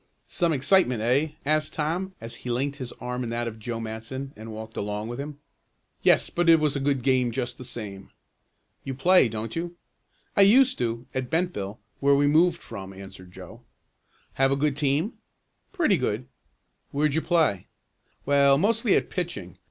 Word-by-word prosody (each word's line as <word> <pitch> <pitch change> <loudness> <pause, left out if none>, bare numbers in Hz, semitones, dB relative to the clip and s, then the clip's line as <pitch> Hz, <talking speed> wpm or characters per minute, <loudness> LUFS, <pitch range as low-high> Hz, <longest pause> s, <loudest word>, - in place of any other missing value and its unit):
"Some 170 -2 +1
excitement; 140 - +3
eh?" 140 +6 +2
asked 155 +1 +1
Tom, 175 +5 -2
as 115 +1 -6
he 125 - -7
linked 135 +4 -1
his 130 -4 -6
arm 125 0 -4
in 120 - -4
that 120 0 -2
of 110 -1 -7
Joe 115 +1 -4
Matson 115 +5 -6
and 110 +1 -9
walked 110 +1 -8
along 105 +2 -3
with 120 +2 -6
him. 145 +1 -6 0.6
"Yes, - - +4
but 175 -1 +1
it 165 -1 +7
was 150 -2 +1
a - - 0
good 135 -2 0
game 130 -2 +2
just 120 +1 -4
the - - -7
same." 105 -6 -8 0.7
"You 135 - -5
play, 175 -1 +5
don't 110 0 -5
you?" 170 +1 -4 0.6
"I - - +5
used 255 +6 +5
to, 115 0 -2
at 130 -1 -3
Bentville, 160 - -1 0.2
where 140 0 +4
we 145 +1 +3
moved 165 +4 +4
from," 95 -3 -8
answered 95 -1 -12
Joe. - - -12 0.7
"Have 135 0 +2
a - - +3
good 140 0 0
team?" 150 - 0 0.5
"Pretty 320 - +2
good." 125 -2 -2 0.6
"Where'd 145 0 +1
you 160 - +1
play?" 160 - +1 0.6
"Well, 140 -1 +5
mostly 220 - +2
at - - 0
pitching. 135 - -5
135 Hz, 175 wpm, -26 LUFS, 115-160 Hz, 0.7 s, it